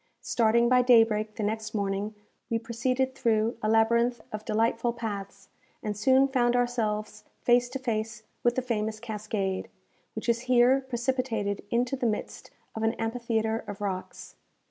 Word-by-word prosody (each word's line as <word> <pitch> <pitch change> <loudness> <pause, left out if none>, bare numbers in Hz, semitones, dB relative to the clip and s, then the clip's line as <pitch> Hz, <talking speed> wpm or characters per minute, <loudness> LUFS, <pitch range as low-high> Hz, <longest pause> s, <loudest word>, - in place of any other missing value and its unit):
Starting 235 +1 +3
by 250 +1 +5
daybreak 225 -3 +4
the 220 - -3
next 215 +1 -3
morning, 200 +1 -2 0.3
we 230 - +1
proceeded 255 +3 -1
through 230 -3 +1
a 215 - 0
labyrinth 235 +2 +3
of 215 0 -5
delightful 230 +2 +1
paths, 200 -4 -6 0.3
and 210 -1 -2
soon 260 +5 +4
found 245 -3 +2
ourselves 225 -4 -1 0.2
face 245 0 +4
to 265 - -4
face 225 -3 -3 0.2
with 240 0 +2
the 260 - 0
famous 220 -3 -2
cascade, 210 -4 -3 0.5
which - - -5
is 235 0 +2
here 255 +2 +5
precipitated 240 -5 -1
into 245 +3 +1
the 255 -2 0
midst 215 - -4 0.2
of 220 - -5
an 225 +1 +1
amphitheatre 225 -1 -1
of 200 - -6
rocks. 190 -3 -5
225 Hz, 150 wpm, -28 LUFS, 215-245 Hz, 0.5 s, by